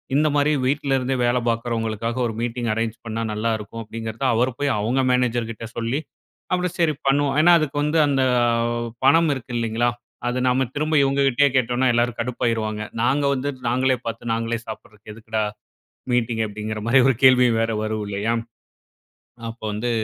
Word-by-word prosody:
இந்தமாரி 145 Hz, 0 st, +2 dB
வீட்ல 140 Hz, 0 st, +1 dB
இருந்தே 130 Hz, +1 st, -1 dB
வேல 120 Hz, +1 st, +2 dB
பார்க்கறவங்களுக்காக 115 Hz, 0 st, -2 dB
ஒரு 115 Hz, -, -4 dB
மீட்டிங் 120 Hz, 0 st, -2 dB
அரேஞ் 115 Hz, 0 st, -1 dB
பண்ணா 115 Hz, 0 st, -3 dB
நல்லாருக்கும் 110 Hz, 0 st, -3 dB
அப்பிடிங்கிறத 115 Hz, +2 st, -6 dB
அவர் 125 Hz, +3 st, +2 dB
போய் 145 Hz, -, +1 dB
அவுங்க 120 Hz, +6 st, +1 dB
மேனேஜர்கிட்ட 120 Hz, -3 st, -1 dB
சொல்லி, 120 Hz, +5 st, -1 dB, 0.5 s
அப்பிடி 180 Hz, 0 st, +1 dB
சரி 165 Hz, -3 st, +3 dB
பண்ணுவோம். 140 Hz, 0 st, +2 dB
ஏன்னா, 175 Hz, +3 st, +6 dB
அதுக்கு 145 Hz, -2 st, -3 dB
வந்து, 150 Hz, +2 st, +1 dB
அந்த 135 Hz, -2 st, +2 dB, 0.8 s
பணம் 165 Hz, +3 st, +5 dB
இருக்கு 125 Hz, -2 st, -7 dB
இல்லேங்களா! 115 Hz, +1 st, 0 dB, 0.4 s
அது 125 Hz, +1 st, -1 dB
நம்ம 130 Hz, +1 st, +2 dB
திரும்ப 155 Hz, +2 st, 0 dB
இவுங்கக்கிட்டயே 140 Hz, 0 st, +3 dB
கேட்டோன்னா 125 Hz, +1 st, +1 dB
எல்லாரும் 120 Hz, 0 st, 0 dB
கடுப்பாயிருவாங்க. 115 Hz, -3 st, -2 dB, 0.2 s
நாங்க 135 Hz, +4 st, +2 dB
வந்து 140 Hz, +1 st, -2 dB, 0.2 s
நாங்களே 130 Hz, +1 st, +2 dB
பார்த்து, 115 Hz, 0 st, -4 dB
நாங்களே 115 Hz, 0 st, -2 dB
சாப்புட்றதுக்கு 110 Hz, -1 st, -10 dB
எதுக்குடா 110 Hz, 0 st, -3 dB, 0.7 s
மீட்டிங்? 115 Hz, -2 st, +1 dB
அப்பிடிங்கிற 110 Hz, +1 st, -5 dB
மாரி 130 Hz, +3 st, +5 dB
ஒரு 135 Hz, -, +3 dB
கேள்வியும் 125 Hz, -3 st, +6 dB
வேற 115 Hz, -, 0 dB
வரும் 110 Hz, -1 st, -2 dB
இல்லயா! 100 Hz, +3 st, -1 dB, 1.2 s
அப்ப 115 Hz, -, -11 dB
வந்து 115 Hz, +4 st, -2 dB
120 Hz, 150 wpm, -22 LUFS, 115-135 Hz, 1.2 s, ஏன்னா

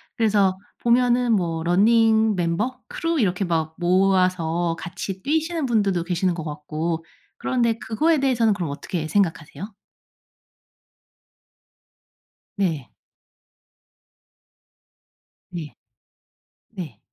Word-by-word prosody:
그래서 200 Hz, -4 st, +2 dB, 0.2 s
보면은 245 Hz, 0 st, +3 dB
뭐 165 Hz, -5 st, 0 dB
러닝 220 Hz, +4 st, +4 dB
멤버, 180 Hz, +9 st, -1 dB
크루 330 Hz, -1 st, -2 dB
이렇게 195 Hz, -4 st, +1 dB
막 160 Hz, -2 st, -1 dB
모아서 180 Hz, -2 st, +2 dB
같이 185 Hz, +2 st, -6 dB
뛰시는 320 Hz, +1 st, 0 dB
분들도 200 Hz, -8 st, +1 dB
계시는 180 Hz, +1 st, 0 dB
것 170 Hz, -2 st, -5 dB
같고 155 Hz, +2 st, -3 dB, 0.3 s
그런데 235 Hz, -3 st, 0 dB
그거에 310 Hz, +8 st, +1 dB
대해서는 240 Hz, -5 st, +2 dB
그럼 180 Hz, -6 st, -3 dB
어떻게 160 Hz, +2 st, -4 dB
생각하세요? 185 Hz, +2 st, -1 dB, 2.8 s
네. 165 Hz, -10 st, -1 dB, 2.6 s
네 155 Hz, -8 st, -7 dB, 0.9 s
네. 180 Hz, -9 st, -8 dB
190 Hz, 200 characters per minute, -23 LUFS, 170-230 Hz, 2.8 s, 러닝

